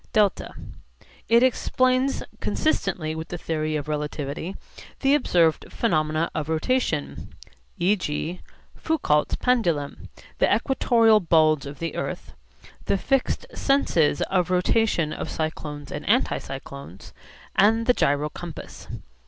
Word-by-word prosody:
(δ) 210 -3 +5 1.0
It 235 +2 +6
explains 255 +1 +2 0.2
(consistently 185 - -1
with 160 0 -6
the 175 - -5
theory 155 -2 -2
of 150 -1 -3
relativity) 150 +3 -4 0.5
the 275 0 +4
observed 175 - +2
phenomena 155 -6 0
of 155 -1 -3
rotation, 160 - -1 0.4
e.g. 175 -2 -1 0.3
Foucault's 250 - +1
pendulum, 175 - 0 0.3
the - - +3
equatorial 230 -5 +4
bulge 155 -5 +3
of 140 0 -8
the 165 0 -4
earth, - - -5 0.5
the 200 - +1
fixed 270 - 0
senses 170 - +2
of 180 -3 0
rotation 180 -3 +1
of - - -5
cyclones 150 -2 -4
and 150 - -5
anticyclones, 140 - -2 0.4
and 225 +3 +4
the 250 - +5
gyro 145 -6 +1
compass. 170 +1 -9
165 Hz, 110 wpm, -24 LUFS, 150-230 Hz, 1.0 s, It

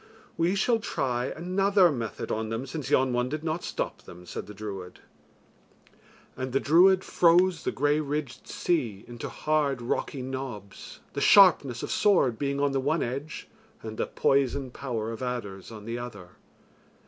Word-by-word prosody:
"We 170 +4 +1
shall 230 +4 +2
try 125 - -1
another 185 +3 +2
method 115 -6 -4
on 110 0 -2
them, 115 +4 -3
since 145 +1 -5
yon 130 -1 +3
one 125 +1 0
did 155 +2 -4
not 165 +1 -2
stop - - -4
them," 90 +1 -13
said - - -6
the 105 - -9
druid. 95 -4 -7 1.4
And 130 -1 -5
the 135 - +3
druid 185 +6 +5
froze 175 0 +3
the - - -1
grey 145 +2 +1
ridged 145 -3 -4
sea 120 - -1
into 120 -1 -7
hard 150 -4 0
rocky 125 +2 -3
knobs, 125 -7 -7
the - - -3
sharpness 170 - +6
of - - -4
sword 170 - +3
being 140 0 -1
on 140 0 +2
the 135 - 0
one 150 +5 0
edge 140 +6 -5 0.4
and 110 -1 -6
the - - 0
poison 135 -1 +1
power 115 -4 -4
of 115 - -7
adders 115 -6 -5
on 105 -2 -10
the 115 +1 -4
other. 100 -7 -8
135 Hz, 165 wpm, -27 LUFS, 120-155 Hz, 1.4 s, sharpness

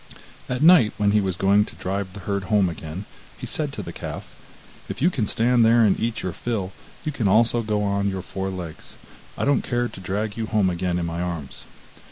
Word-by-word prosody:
At 125 +3 -1
night 160 -11 +7
when 105 -1 +3
he 105 0 +4
was 95 -2 -1
going 100 +3 +4
to - - -12
drive 95 0 -3
the 100 - -8
herd 100 +1 -2
home 100 -2 +3
again, 80 +3 -7 0.3
he - - -6
said - - -2
to - - -5
the - - -7
calf: - - -6 0.6
'If - - -5
you 175 +7 +3
can 115 - -1
stand 120 +2 +3
there 115 0 +5
and 100 - +2
eat 115 0 -2
your 90 - -2
fill, 100 -3 -3 0.3
you 155 - 0
can 125 -8 -1
also 115 +4 +4
go 105 -2 -1
on 100 0 +1
your 95 -2 -4
four 95 0 -4
legs; 90 -4 -7 0.4
I - - 0
don't 140 -3 +3
care 120 -1 -1
to - - -11
drag 105 +3 -3
you 110 -1 -2
home 105 -5 +2
again 90 0 -1
in 85 - -1
my 85 +1 -3
arms. 85 -6 -5
100 Hz, 225 wpm, -24 LUFS, 95-115 Hz, 0.6 s, night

